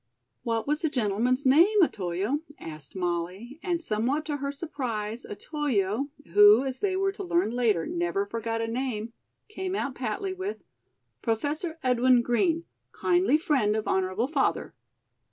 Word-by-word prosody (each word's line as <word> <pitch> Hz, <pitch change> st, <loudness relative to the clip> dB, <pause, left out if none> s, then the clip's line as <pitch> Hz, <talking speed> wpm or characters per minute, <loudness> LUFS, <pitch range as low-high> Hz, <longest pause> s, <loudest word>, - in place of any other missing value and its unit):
"What 230 Hz, -2 st, -1 dB
was 300 Hz, +2 st, 0 dB
the 320 Hz, -, +1 dB
gentleman's 245 Hz, +2 st, 0 dB
name, 355 Hz, +10 st, +6 dB
Otoyo?" 195 Hz, -, -1 dB, 0.2 s
asked 155 Hz, -2 st, -10 dB
Molly; 185 Hz, -, -3 dB
and 350 Hz, -3 st, -1 dB
somewhat 260 Hz, +3 st, -1 dB
to 295 Hz, -1 st, -2 dB
her 280 Hz, 0 st, -3 dB
surprise 245 Hz, -7 st, -4 dB
Otoyo, 255 Hz, -, -1 dB, 0.2 s
who, 205 Hz, +4 st, +8 dB
as 265 Hz, -1 st, -4 dB
they 385 Hz, -2 st, 0 dB
were 390 Hz, +1 st, +1 dB
to 400 Hz, 0 st, -7 dB
learn 345 Hz, -, +1 dB
later, 230 Hz, -9 st, +1 dB
never 175 Hz, +3 st, -1 dB
forgot 225 Hz, +2 st, -3 dB
a 225 Hz, -, -1 dB
name, 230 Hz, -2 st, -3 dB, 0.3 s
came 380 Hz, -3 st, -4 dB
out 280 Hz, -9 st, -2 dB
patly 260 Hz, -, -3 dB
with: 380 Hz, +3 st, -5 dB, 0.6 s
"Professor 295 Hz, +9 st, -2 dB
Edwin 250 Hz, -1 st, +4 dB
Green, 330 Hz, +8 st, +1 dB, 0.3 s
kindly 350 Hz, -4 st, +2 dB
friend 275 Hz, -, +1 dB
of 220 Hz, -, -2 dB
honorable 190 Hz, +5 st, 0 dB
father." 285 Hz, -2 st, 0 dB
250 Hz, 145 wpm, -27 LUFS, 210-310 Hz, 0.6 s, who